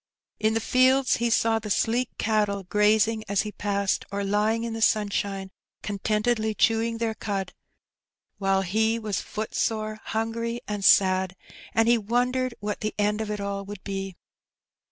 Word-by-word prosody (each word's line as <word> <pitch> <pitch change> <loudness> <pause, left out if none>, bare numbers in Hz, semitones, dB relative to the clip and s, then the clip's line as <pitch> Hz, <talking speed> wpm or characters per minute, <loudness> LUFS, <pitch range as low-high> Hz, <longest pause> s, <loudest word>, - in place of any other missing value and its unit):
In 220 +1 +1
the - - +2
fields 255 +3 +3
he 235 0 0
saw 225 0 +2
the 210 -1 -7
sleek 235 +5 +1
cattle 210 -2 0
grazing 215 +3 +2
as 200 0 +2
he 210 - -5
passed^ 200 -1 -1
or 200 0 -2
lying 210 +3 +1
in 230 -1 -3
the 225 - -4
snnshine 200 -3 0 0.3
con 205 -1 -4
tentedly 220 +1 0
chewing 230 0 +2
their 225 -1 -1
cud, 200 -3 -4 0.9
while 195 -1 +2
he 220 +4 +1
was 215 -4 -3
footsore^ 215 0 -2
hungry, 230 +1 -2
and 205 -1 -3
sad, 185 -1 +4 0.4
and 225 0 +4
he 235 0 +4
wondered 250 +3 0
what 205 0 -3
the 215 0 -3
end 210 +1 +1
of 220 - -4
it 210 0 -3
all 200 0 -3
would 205 -1 -9
be. 195 -2 -4
215 Hz, 160 wpm, -26 LUFS, 200-225 Hz, 0.9 s, sad